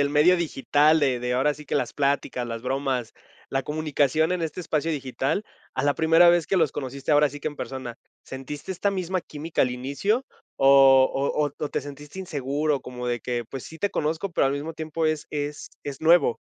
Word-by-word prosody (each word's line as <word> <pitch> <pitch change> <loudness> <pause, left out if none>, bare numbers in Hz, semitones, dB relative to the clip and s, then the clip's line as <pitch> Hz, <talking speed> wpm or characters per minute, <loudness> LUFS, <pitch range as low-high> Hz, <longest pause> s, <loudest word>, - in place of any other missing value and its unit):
del 140 - +2
medio 155 +5 +5
digital, 155 -1 +3
de 130 -4 +1
de, 125 0 -1
ahora 135 +4 +2
sí 150 +1 -12
que, - - -3
las 120 - 0
plática, 140 -3 -1
las 115 -1 -5
bromas, 130 -2 -2 0.4
la 135 0 0
comunicación 155 +1 +1
en 180 - -1
este 165 +1 -3
espacio 160 -2 -1
digital, 140 +5 -2 0.3
a 130 - -1
la 145 0 +3
primera 165 +2 +6
vez 175 -2 +2
que 195 - +1
los 160 -5 +2
conociste, 135 +2 -3
ahora 150 0 +5
sí 145 +2 -9
que 155 - -1
en 145 - -10
persona?, 130 -3 -6 0.3
¿sentiste 140 +7 -7
esta 195 +2 0
misma 185 -1 -2
química 155 0 -4
al 125 - +3
inicio 140 - -1 0.3
o 135 -1 +7
o 140 +1 0
o - - -2
te - - -2
sentiste 145 +4 -10
inseguro?, 145 -4 -1
como 125 -1 -7
de 120 -1 -1
que, 120 0 -3
pues, 130 +3 -8
sí 160 - -11
te 205 - 0
conozco, 160 +5 -2
pero 150 - +3
al 135 - +1
mismo 150 +3 -4
tiempo 160 0 -3
es 155 -1 0
es 145 0 -4
es 140 -2 -6
nuevo. 160 -6 +4
145 Hz, 205 wpm, -25 LUFS, 135-160 Hz, 0.4 s, o